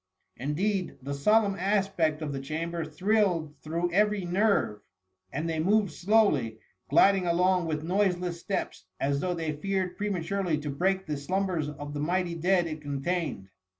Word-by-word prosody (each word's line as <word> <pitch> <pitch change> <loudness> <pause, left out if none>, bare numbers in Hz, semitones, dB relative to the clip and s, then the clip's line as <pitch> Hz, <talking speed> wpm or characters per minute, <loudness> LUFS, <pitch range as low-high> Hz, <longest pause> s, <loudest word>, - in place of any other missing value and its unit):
Indeed, 180 +8 -1
the 140 +1 -3
solemn 205 +8 +3
aspect 190 -5 +1
of 145 -2 -3
the 135 - -3
chamber 165 +4 -3
thrilled 175 -1 +1
through 170 +3 -2
every 210 0 +2
nerve, 185 - +1 0.5
and 155 +4 -2
they 160 -1 -1
moved 200 +3 +2
slowly, 175 - +2 0.3
gliding 195 -2 +5
along 180 0 +2
with 155 -1 -2
noiseless 180 -1 0
steps 195 - -3
as 140 +1 +1
though 180 +3 -1
they 160 -2 -2
feared 185 +3 -2
prematurely 195 -3 -1
to 150 -1 -3
break 190 +6 0
the 150 -2 -3
slumbers 180 0 -1
of 145 0 -7
the 145 - -4
mighty 175 +3 0
dead 175 +2 +2
it 155 -2 -5
contained. 145 - -3
175 Hz, 150 wpm, -28 LUFS, 150-195 Hz, 0.5 s, gliding